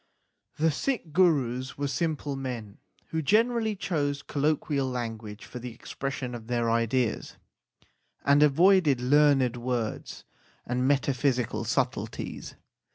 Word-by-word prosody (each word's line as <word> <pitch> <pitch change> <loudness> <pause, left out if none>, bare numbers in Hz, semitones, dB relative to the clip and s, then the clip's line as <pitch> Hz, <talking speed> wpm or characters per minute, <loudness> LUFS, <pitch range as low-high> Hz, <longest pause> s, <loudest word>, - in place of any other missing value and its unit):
The 160 +1 +3
Sikh 175 - -2
Gurus 135 -8 +2
were 145 0 -1
simple 145 0 -2
men 120 -6 -6 0.3
who 160 - -1
generally 220 - +2
chose 145 -7 -2
colloquial 145 -2 0
language 115 -4 -5
for 125 - -8
the 125 0 -6
expression 130 +2 -5
of 115 -2 -8
their 120 -1 0
ideas, 115 +1 0 0.9
and 140 +1 +5
avoided 155 -1 +5
learned 135 -1 +3
words 120 -2 -3 0.4
and 125 +1 0
meta 140 0 +2
physical 125 -2 0
subtleties. - - -3
135 Hz, 115 wpm, -27 LUFS, 120-150 Hz, 0.9 s, and